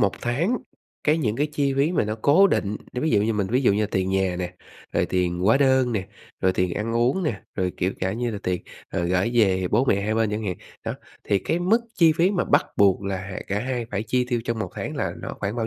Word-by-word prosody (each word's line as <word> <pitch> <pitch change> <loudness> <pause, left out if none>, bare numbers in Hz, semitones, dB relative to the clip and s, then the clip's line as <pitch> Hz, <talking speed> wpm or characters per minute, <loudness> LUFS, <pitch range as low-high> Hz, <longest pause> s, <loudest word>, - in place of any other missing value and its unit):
1 100 -1 +3
tháng 165 - 0 0.5
cái 155 +2 +3
những 115 -6 0
cái 145 +2 +1
chi 140 -2 +1
phí 145 +6 +2
mà - - +2
nó 105 +1 -2
cố 180 +8 +6
định, 105 - 0 0.2
nói 125 - -3
ví 160 - +2
dụ 100 - +3
như 110 +2 +1
mình 100 -3 0
ví 125 +6 +1
dụ 120 - +4
như 105 +1 +1
tiền 95 -2 -1
nhà 95 -2 +1
nè, 90 0 -4 0.4
rồi - - +1
tiền 90 -1 0
hóa 100 +8 +4
đơn 130 -3 +3
nè, 95 -3 -2 0.3
rồi 95 -1 +3
tiền 90 -1 0
ăn 115 +2 -2
uống 125 +10 +2
nè, 120 - -2
rồi 90 -1 -1
kiểu 95 +2 0
cả 95 +1 0
như 120 +1 -2
là 105 - -4
tiền, 90 -1 -1 0.3
ờ, 85 - -2
gởi 90 +5 +1
về 95 -5 +3
bố 120 +5 +3
mẹ 100 -6 +2
hai 110 +1 0
bên 110 -2 +1
chẳng 110 +1 -3
hạn. 95 -3 -2 0.3
Đó, - - -2 0.3
thì 100 - +2
cái 165 - -1
mức 205 +7 +3
chi 165 -3 +5
phí 175 +4 +4
mà 185 -4 0
bắt - - +3
buộc 100 -1 +4
là, 100 -1 -2
à, 95 0 -6
cả 100 +1 -1
2 120 -1 -3
phải 100 +1 -1
chi 125 +2 0
tiêu 120 -2 0
trong 115 -2 -2
1 95 -4 -3
tháng - - -5
là - - -1
nó - - -5
khoảng 105 +3 -2
bao 115 - -1
110 Hz, 270 wpm, -24 LUFS, 95-130 Hz, 0.5 s, cố